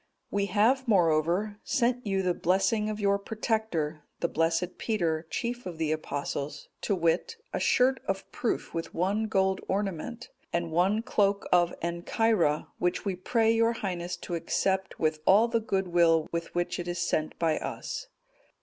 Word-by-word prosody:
"We 200 0 0
have, 245 +6 +2
moreover, 180 +2 +2
sent 245 -3 0
you 195 -1 +1
the 180 -1 +2
blessing 205 +5 +1
of 215 0 -4
your 200 -1 +2
protector, 200 -8 -2 0.2
the 170 - +1
blessed 165 +2 0
Peter, 165 -7 -1
chief 240 -2 -3
of 175 -3 -6
the 160 -1 0
Apostles, 145 -1 -4
to 200 - +1
wit, 175 - 0 0.2
a - - 0
shirt 260 +1 +3
of 195 0 -2
proof 240 - -2
with 165 0 -4
one 200 +6 +1
gold 190 -2 +1
ornament, 205 +5 -3 0.2
and 170 -1 -1
one 190 +7 +2
cloak 200 -4 +1
of 175 -1 +4
Ancyra, 170 -1 +1
which 180 +3 0
we 195 -2 0
pray 225 +5 +2
your 230 +1 +3
Highness 180 -5 -3
to 175 - -5
accept 190 +3 0
with 155 -1 +1
all 210 +5 +6
the 230 -1 +1
goodwill 175 -6 +2
with 170 0 -4
which 175 0 -1
it 175 - -4
is 175 0 -2
sent 155 -2 -1
by 160 -2 +1
us." - - -5
190 Hz, 160 wpm, -28 LUFS, 170-220 Hz, 0.2 s, all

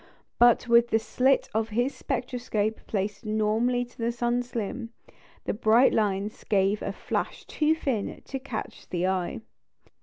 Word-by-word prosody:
But 240 0 +5
with 235 0 +6
the 225 - +3
slit 255 +4 +2
of 220 +1 0
his 245 +5 0
spectroscope 245 -4 -2
placed 205 +1 -2
normally 220 +3 +1
to 245 - -22
the 230 +1 0
sun's 240 +1 -1
limb, 230 +2 -3 0.6
the - - 0
bright 225 +4 +4
lines 205 0 -1
gave 200 +1 +2
a - - -2
flash - - -3
too 310 +1 +1
thin 260 -10 -2
to 270 - -5
catch 255 -4 -7
the 175 0 -1
eye. 185 +2 -1
230 Hz, 150 wpm, -27 LUFS, 210-245 Hz, 0.6 s, with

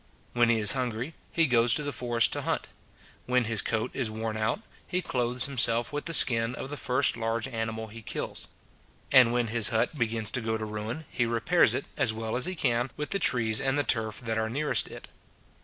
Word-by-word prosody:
When 120 -1 +3
he 115 - +3
is 105 -2 +3
hungry, 125 +2 -3 0.2
he 165 - +3
goes 120 -4 +4
to 150 - -2
the 145 - -3
forest 120 -2 +1
to - - -2
hunt; - - -2 0.6
when 125 0 +2
his 115 -2 0
coat 110 +2 -2
is 125 -5 -2
worn 110 0 -4
out, 110 - -1 0.3
he 180 - -1
clothes 125 -6 +2
himself 120 0 +1
with 145 - -3
the 165 - -1
skin 115 -2 +4
of 135 - -6
the - - -3
first 130 -1 +2
large 115 +1 -2
animal 110 -2 -4
he 110 +1 -11
kills: - - -4 0.6
and 125 -3 +7
when 120 -1 0
his 110 -3 +2
hut 115 +6 0
begins 115 -4 -2
to 125 - -2
go 110 0 -1
to 110 - -4
ruin, 110 +8 -5
he 120 - 0
repairs 115 -1 +3
it, - - -3
as 110 - +2
well 110 +1 -4
as 125 +6 +3
he 185 - -3
can, 125 -4 0
with 150 - -5
the 195 - 0
trees 115 - +2
and 135 +1 0
the 145 - +1
turf 110 -5 0
that 110 -2 -2
are 110 0 -1
nearest 145 +6 0
it. - - -10
120 Hz, 220 wpm, -28 LUFS, 110-130 Hz, 0.6 s, and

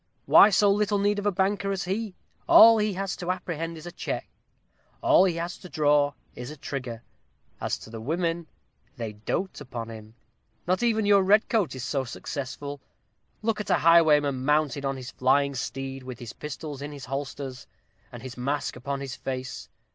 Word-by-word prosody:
Who 205 - +8
so 205 0 +4
little 205 0 +1
need 205 +1 +1
of 205 - -2
a - - +3
banker 195 +1 0
as 195 0 -2
he? 195 +2 -3 0.3
all 225 0 +9
he 210 -1 +1
has 195 -1 -2
to 175 - -5
apprehend 165 -2 -3
is 160 - -10
a 175 - -6
check - - -4 0.7
all 320 - +5
he 180 -3 +1
has 170 +1 -4
to 180 - -11
draw 145 -2 +3 0.2
is 125 0 -7
a 155 - -9
trigger. 130 -4 -6 0.6
As - - -2
to 110 - -13
the 115 -1 -7
women, 165 +5 -1 0.5
they 115 -3 -4
dote 145 - -3
upon 120 -4 -6
him: 110 0 -11 0.5
not 185 +1 +1
even 225 -3 +2
your 200 -1 +6
red 200 +3 +4
coat 210 - +1
is 130 - -6
so 135 0 -1
successful. 140 +2 -6 0.6
Look 215 -1 0
at 210 - -7
a - - +5
highwayman 150 -5 +4
mounted 150 -1 +1
on 135 0 -1
his 130 -1 -8
flying 140 +2 +2
steed, 135 +1 -5
with 130 -1 -8
his 120 -2 -8
pistols 150 -1 -7
in 145 +1 -5
his 140 -3 -8
holsters, 135 -1 -5 0.4
and 120 -1 -10
his 130 -2 -7
mask 140 +4 -2
upon 140 +2 -4
his 135 -2 -5
face. 130 0 -5
150 Hz, 185 wpm, -26 LUFS, 130-190 Hz, 0.7 s, all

